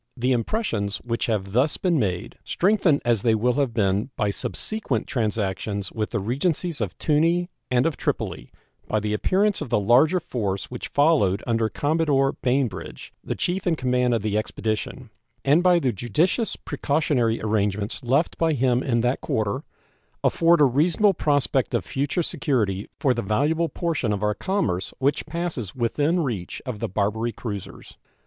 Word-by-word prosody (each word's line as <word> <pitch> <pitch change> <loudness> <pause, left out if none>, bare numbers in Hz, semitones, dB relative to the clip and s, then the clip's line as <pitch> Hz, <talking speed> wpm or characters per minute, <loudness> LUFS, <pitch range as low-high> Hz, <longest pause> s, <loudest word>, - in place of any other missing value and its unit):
The 125 +2 +1
impressions 115 - -1
which 115 -1 -2
have 100 -4 -1
thus 130 +8 +2
been 175 -5 +1
made, 90 -5 -2
strengthened 185 -6 +2
as 120 -4 +2
they 115 0 +3
will 120 +3 +2
have 140 -2 0
been 100 0 0
by 105 -1 0
subsequent 140 - -3
transactions 100 -3 -2
with 110 -1 -2
the 115 - -2
Regencies 145 - -1
of 100 -4 -3
Tunis 165 +4 +2 0.2
and 125 0 +2
of 165 -3 0
Tripoli - - -3 0.4
by 110 - +1
the 105 0 -2
appearance 195 - +1
of - - -4
the - - +2
larger 130 - +4
force 105 - -3
which 125 - -5
followed 145 - +2
under 115 -1 +1
Commodore 145 -2 +1
Bainbridge, 125 -6 -2
the - - -3
chief 180 +1 -2
in 170 - +3
command 125 -3 +1
of 110 - -2
the 105 0 +1
expedition, 110 0 -4 0.3
and 145 +5 +5
by 180 -1 +5
the 135 -7 +1
judicious 155 - 0
precautionary 140 -6 0
arrangements 105 0 -1
left 135 +7 +1
by 165 -1 +2
him 125 -2 +2
in 120 -4 +1
that 125 +2 0
quarter, 105 -2 -1 0.6
afford 170 -1 +4
a - - +8
reasonable 165 - +3
prospect 145 -5 +1
of - - -1
future 145 +6 -1
security 105 - -1
for 130 - +3
the 120 - -2
valuable 150 +11 +1
portion 160 -10 -1
of 105 0 -2
our 105 0 +2
commerce 110 - -2
which 140 +4 0
passes 155 - -4
within 145 +8 +1
reach 110 - -3
of 125 -5 -5
the - - -2
Barbary 105 +4 -1
cruisers. 100 -5 -8
125 Hz, 165 wpm, -24 LUFS, 105-155 Hz, 0.6 s, a